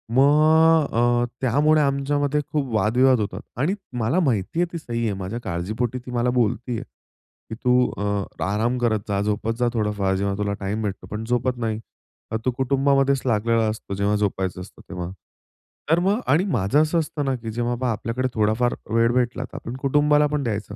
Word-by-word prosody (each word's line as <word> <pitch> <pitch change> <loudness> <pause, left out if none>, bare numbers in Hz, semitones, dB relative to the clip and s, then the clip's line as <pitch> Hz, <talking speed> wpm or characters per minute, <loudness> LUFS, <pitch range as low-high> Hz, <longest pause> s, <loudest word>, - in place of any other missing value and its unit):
मग 155 +3 +5
अ, 120 +1 +2 0.2
त्यामुळे 150 +5 +3
आमच्यामध्ये 145 +1 +1
खूप 135 -6 -1
वादविवाद 125 +5 +3
होतात 105 - -4 0.2
आणि 160 +9 +1 0.2
मला 115 +11 +1
माहिती 130 - 0
आहे 175 - +4
ती - - -2
सही 120 -7 -4
आहे. 110 -3 0
माझ्या 95 +5 -4
काळजीपोटी 110 +9 -2
ती 125 - -7
मला 120 0 +1
बोलती 120 +2 0
आहे - - -5 0.7
की, 110 - -5
"तू 125 +2 +2
अ, 100 -1 -1 0.3
आराम 115 +4 0
करत 115 -3 +1
जा, 100 -1 0
झोपत 105 +2 -1
जा 125 - +2
थोडाफार 105 -3 0
जेव्हा 100 +1 -1
तुला 100 -1 -1
टाईम 105 +3 -2
भेटतो, 100 -2 -4
पण 105 +2 -5
झोपत 125 +1 0
नाही. 110 -2 -2 0.7
तू 130 - +2
कुटुंबामध्येच 135 +1 +2
लागलेला 115 -1 +2
असतो 110 -2 -5
जेव्हा 100 +1 +1
झोपायचं 95 -3 -1
असतं 95 - -12
तेव्हा." 90 -1 -5 0.8
तर 165 +2 +4
मग 195 +5 +1
आणि 160 +5 +4
माझं 135 - +2
असं 160 +2 +2
असतं 150 -2 -3
ना 135 -1 0
की 115 -2 -6
जेव्हा 120 +2 -1
बा, - - -9
पहा 125 -2 +1
आपल्याकडे 115 +3 -2
थोडा 110 -2 +2
फार 120 0 +2 0.2
वेळ 115 +1 +4
भेटला 125 0 0
तर - - -16
आपण 115 - -6
कुटुंबाला 150 +1 +3
पण 150 -1 -2
द्यायचं. 105 -3 -3
120 Hz, 190 wpm, -23 LUFS, 105-140 Hz, 0.8 s, मग